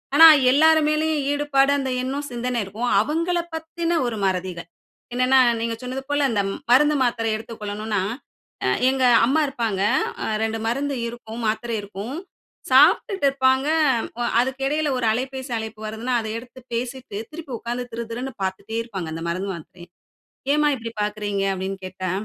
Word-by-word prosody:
ஆனா, 325 Hz, +2 st, +11 dB, 0.2 s
எல்லார்மேலயும் 310 Hz, 0 st, +3 dB
ஈடுபாடு 285 Hz, -1 st, +2 dB
அந்த 265 Hz, -1 st, -2 dB
எண்ணம் 280 Hz, +3 st, -3 dB
சிந்தனை 245 Hz, 0 st, -2 dB
இருக்கும். 220 Hz, +6 st, -3 dB
அவங்களப் 335 Hz, +6 st, -1 dB
பத்தின 330 Hz, +1 st, -2 dB
ஒரு 235 Hz, -2 st, -2 dB
மறதிகள். 185 Hz, -3 st, -2 dB, 0.5 s
என்னன்னா, 255 Hz, +2 st, +4 dB, 0.2 s
நீங்க 230 Hz, 0 st, -1 dB
சொன்னது 255 Hz, +1 st, -5 dB
போல 290 Hz, 0 st, +2 dB
இந்த 205 Hz, -3 st, +1 dB, 0.3 s
மருந்து, 295 Hz, +4 st, +5 dB
மாத்திரை 230 Hz, -2 st, 0 dB
எடுத்துக்கொள்ளணுனா, 215 Hz, -2 st, -4 dB, 0.6 s
அ -, -, +2 dB, 0.2 s
எங்க 265 Hz, 0 st, 0 dB, 0.2 s
அம்மா 285 Hz, +6 st, +2 dB
இருப்பாங்க. 230 Hz, -8 st, -2 dB, 0.4 s
அ -, -, -2 dB, 0.2 s
2 225 Hz, 0 st, -1 dB
மருந்து 275 Hz, +4 st, -1 dB
இருக்கும், 235 Hz, -1 st, -8 dB
மாத்திரை 225 Hz, +2 st, -1 dB
இருக்கும். 205 Hz, +5 st, -7 dB, 0.6 s
சாப்புட்டு 315 Hz, -, +5 dB
இருப்பாங்க 265 Hz, 0 st, +2 dB, 0.5 s
அ -, -, +1 dB, 0.2 s
அதுக்கு 260 Hz, +2 st, -1 dB
இடையில 300 Hz, +1 st, 0 dB
ஒரு 250 Hz, -, -1 dB
அலைபேசி 260 Hz, +3 st, -3 dB
அழைப்பு 220 Hz, -1 st, -6 dB
வருதுன்னா, 225 Hz, +4 st, -2 dB
அத 220 Hz, -, -6 dB
எடுத்து 245 Hz, +2 st, -14 dB
பேசிட்டு 245 Hz, -2 st, -4 dB
திருப்பி 310 Hz, -3 st, -9 dB
உட்கார்ந்து 240 Hz, +2 st, -4 dB
திருதிருன்னு 235 Hz, +3 st, -5 dB
பார்த்துட்டே 190 Hz, +4 st, -4 dB
இருப்பாங்க. 195 Hz, -7 st, -6 dB
அந்த 165 Hz, +1 st, -5 dB
மருந்து, 185 Hz, +3 st, -2 dB
மாத்திரைய. 175 Hz, +2 st, -12 dB, 0.7 s
"ஏம்மா 300 Hz, 0 st, +3 dB
இப்படி 230 Hz, -2 st, -6 dB
பார்க்கிறீங்க?" 210 Hz, -1 st, -2 dB
அப்பிடின்னு 190 Hz, +1 st, -4 dB
கேட்டா. 185 Hz, 0 st, -4 dB
245 Hz, 145 wpm, -23 LUFS, 215-280 Hz, 0.7 s, ஆனா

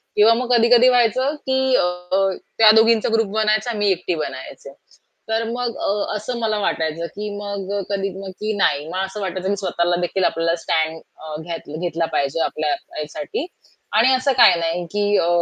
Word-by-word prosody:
किंवा 215 Hz, +2 st, +6 dB
मग 250 Hz, +1 st, -2 dB
कधी-कधी 235 Hz, +1 st, +5 dB
व्हायचं 255 Hz, +4 st, +2 dB
की 265 Hz, 0 st, +2 dB
अ, -, -, +3 dB, 0.7 s
त्या 220 Hz, -1 st, +8 dB
दोघींचा 225 Hz, 0 st, +4 dB
ग्रुप 225 Hz, -1 st, +2 dB
बनायचा 215 Hz, +2 st, +1 dB
मी 205 Hz, -1 st, +2 dB
एकटी 180 Hz, -1 st, -1 dB
बनायचे. 140 Hz, -2 st, -7 dB, 0.6 s
तर 225 Hz, +1 st, 0 dB
मग 240 Hz, 0 st, -3 dB
अ 205 Hz, +1 st, -1 dB
असं 215 Hz, +4 st, -4 dB
मला 220 Hz, -2 st, 0 dB
वाटायचं, 165 Hz, -4 st, -1 dB
की 210 Hz, +1 st, -4 dB
मग 200 Hz, -1 st, -5 dB, 0.2 s
कधी 195 Hz, -1 st, -1 dB, 0.3 s
की 215 Hz, +1 st, -2 dB
नाही 150 Hz, -6 st, +1 dB
मला 185 Hz, +3 st, -2 dB
असं 195 Hz, +2 st, -6 dB
वाटायचं, 185 Hz, -1 st, -3 dB
की 200 Hz, -, +1 dB
स्वतःलादेखील 175 Hz, 0 st, -1 dB
आपल्याला 165 Hz, +1 st, +1 dB
स्टॅड 160 Hz, -1 st, 0 dB, 0.2 s
अ, 155 Hz, -1 st, -8 dB
घेत 165 Hz, -1 st, -7 dB
घेतला 170 Hz, -1 st, -1 dB
पाहिजे 140 Hz, +3 st, 0 dB
आपल्या 155 Hz, -1 st, -2 dB
ह्यासाठी 155 Hz, -, -5 dB, 0.5 s
आणि 255 Hz, +4 st, +5 dB
असं 260 Hz, +2 st, +2 dB
काही 170 Hz, -, +7 dB
नाही 170 Hz, +1 st, -2 dB
की 205 Hz, 0 st, +2 dB
अ, 170 Hz, -, +1 dB
205 Hz, 165 wpm, -21 LUFS, 170-225 Hz, 0.7 s, त्या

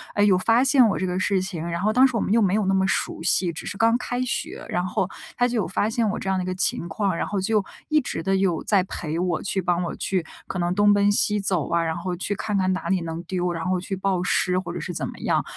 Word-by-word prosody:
哎， 205 Hz, -, +3 dB
有 195 Hz, -3 st, +5 dB
发 230 Hz, +6 st, +3 dB
现 265 Hz, -2 st, +5 dB
我 195 Hz, -, -1 dB
这 185 Hz, -, -1 dB
个 180 Hz, 0 st, -1 dB
事 190 Hz, 0 st, +1 dB
情， 185 Hz, -4 st, -5 dB
然 170 Hz, +1 st, -3 dB
后 215 Hz, -, +2 dB
当 260 Hz, +2 st, +6 dB
时 255 Hz, -, -5 dB
我 -, -, +1 dB
们 -, -, -1 dB
又 230 Hz, -, +4 dB
没 195 Hz, -2 st, +2 dB
有 210 Hz, -2 st, +1 dB
那 195 Hz, -, +2 dB
么 190 Hz, 0 st, +2 dB
熟 165 Hz, -, -1 dB
悉， 180 Hz, 0 st, +2 dB
只 165 Hz, -, -7 dB
是 200 Hz, -, -5 dB
刚 230 Hz, +1 st, +4 dB
开 245 Hz, 0 st, -3 dB
学， 250 Hz, -2 st, -3 dB
然 180 Hz, +1 st, -1 dB
后 185 Hz, 0 st, -1 dB, 0.3 s
他 245 Hz, -, +3 dB
就 245 Hz, -1 st, -2 dB
有 210 Hz, -, 0 dB
发 205 Hz, +3 st, 0 dB
现 225 Hz, 0 st, 0 dB
我 215 Hz, -, -2 dB
这 195 Hz, -, -4 dB
样 190 Hz, -, +1 dB
的 185 Hz, -, -1 dB
一 -, -, -5 dB
个 185 Hz, -, -1 dB
情 175 Hz, -1 st, 0 dB
况， 190 Hz, +1 st, -1 dB
然 -, -, -2 dB
后 205 Hz, -, -2 dB
就 210 Hz, +1 st, +1 dB, 0.3 s
一 305 Hz, 0 st, +4 dB
直 240 Hz, -, -4 dB
的 195 Hz, +3 st, +1 dB
有 190 Hz, -4 st, +1 dB
在 195 Hz, -3 st, +3 dB
陪 160 Hz, -4 st, -4 dB
我， 180 Hz, -1 st, 0 dB
去 195 Hz, -1 st, -1 dB
帮 175 Hz, 0 st, 0 dB
我 170 Hz, -, -4 dB
去 185 Hz, -4 st, -1 dB, 0.2 s
可 185 Hz, -, -4 dB
能 175 Hz, 0 st, 0 dB
东 205 Hz, 0 st, +5 dB
奔 205 Hz, 0 st, +3 dB
西 210 Hz, 0 st, +2 dB
走 190 Hz, -6 st, -1 dB
啊， 170 Hz, 0 st, +1 dB
然 160 Hz, 0 st, -2 dB
后 175 Hz, +1 st, -3 dB
去 190 Hz, +3 st, -2 dB
看 205 Hz, +1 st, -2 dB
看 185 Hz, -1 st, +1 dB
哪 185 Hz, -, -4 dB
里 190 Hz, -2 st, +1 dB
能 165 Hz, 0 st, -5 dB
丢， 180 Hz, -1 st, -2 dB
然 165 Hz, 0 st, -4 dB
后 185 Hz, 0 st, +1 dB
去 195 Hz, +2 st, -4 dB
报 190 Hz, -1 st, 0 dB
失 180 Hz, -1 st, +1 dB
或 175 Hz, -2 st, -6 dB
者 175 Hz, -, -4 dB
是 175 Hz, -, -5 dB
怎 -, -, -3 dB
么 -, -, -10 dB
样。 -, -, +1 dB
190 Hz, 320 characters per minute, -24 LUFS, 180-205 Hz, 0.3 s, 当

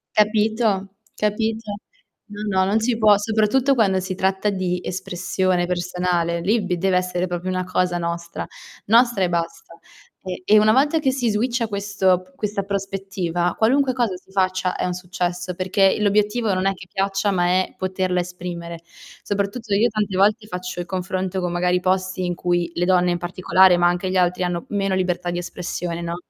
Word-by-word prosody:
Capito, 210 Hz, -2 st, +1 dB, 0.2 s
capito? 220 Hz, +1 st, -1 dB, 0.5 s
No, 205 Hz, -2 st, -3 dB
no, 185 Hz, -, +3 dB
non 210 Hz, +3 st, +2 dB
ci 230 Hz, 0 st, +1 dB
può 210 Hz, -2 st, +5 dB
soprattutto 220 Hz, +6 st, +2 dB
quando 195 Hz, -5 st, +2 dB
si 185 Hz, 0 st, -4 dB
tratta 190 Hz, +2 st, 0 dB
di 185 Hz, -2 st, -2 dB
espressione 185 Hz, 0 st, -1 dB
personale, 175 Hz, -1 st, -1 dB
lì 210 Hz, +6 st, +2 dB
b 185 Hz, -2 st, -2 dB
deve 185 Hz, +1 st, +2 dB
essere 180 Hz, 0 st, -1 dB
proprio 175 Hz, +1 st, -4 dB
una 185 Hz, 0 st, -1 dB
cosa 180 Hz, -1 st, 0 dB
nostra, 170 Hz, 0 st, -4 dB, 0.4 s
nostra 235 Hz, -2 st, +4 dB
e 175 Hz, -, +1 dB
basta, 170 Hz, 0 st, -4 dB, 0.5 s
e 185 Hz, -1 st, -5 dB
e 215 Hz, 0 st, +6 dB
una 215 Hz, +1 st, +4 dB
volta 290 Hz, +4 st, +3 dB
che 270 Hz, -3 st, +1 dB
si 250 Hz, -3 st, 0 dB
switcha 235 Hz, +2 st, 0 dB
questo 200 Hz, -3 st, +1 dB
p 185 Hz, 0 st, -25 dB
questa 205 Hz, -1 st, -2 dB
prospettiva 195 Hz, -3 st, -2 dB
qualunque 260 Hz, +3 st, +3 dB
cosa 235 Hz, -7 st, 0 dB
si 190 Hz, -, -23 dB
faccia 185 Hz, -1 st, 0 dB
è -, -, -2 dB
un 180 Hz, -, -1 dB
successo, 180 Hz, 0 st, -3 dB
perché 190 Hz, +1 st, +2 dB
l'obiettivo 210 Hz, +1 st, +2 dB
non 185 Hz, +1 st, -1 dB
è 195 Hz, -, +2 dB
che 185 Hz, 0 st, -13 dB
piaccia, 195 Hz, +1 st, 0 dB
ma 175 Hz, -2 st, +1 dB
è 185 Hz, +1 st, +1 dB
poterla 185 Hz, -1 st, -1 dB
esprimere. 175 Hz, -1 st, -6 dB, 0.4 s
Soprattutto 205 Hz, +2 st, -2 dB
io 220 Hz, +4 st, +4 dB
tante 210 Hz, -3 st, -2 dB
volte 210 Hz, +3 st, +3 dB
faccio 180 Hz, -1 st, -5 dB
il -, -, -6 dB
confronto 185 Hz, 0 st, -3 dB
con 180 Hz, -1 st, -2 dB
magari 180 Hz, +1 st, +1 dB
posti 185 Hz, 0 st, -1 dB
in 175 Hz, -1 st, -2 dB
cui, 175 Hz, -1 st, 0 dB
le 175 Hz, -, +1 dB
donne 180 Hz, -1 st, +3 dB
in 175 Hz, -, 0 dB
particolare, 180 Hz, +1 st, +3 dB
ma 175 Hz, 0 st, +4 dB
anche 175 Hz, +1 st, 0 dB
gli 185 Hz, -, 0 dB
altri, 180 Hz, 0 st, +2 dB
hanno 175 Hz, -1 st, -2 dB
meno 195 Hz, -2 st, 0 dB
libertà 180 Hz, -1 st, -1 dB
di 175 Hz, -, -3 dB
espressione, 175 Hz, -1 st, -4 dB
no, 170 Hz, 0 st, -3 dB
185 Hz, 180 wpm, -22 LUFS, 180-210 Hz, 0.5 s, e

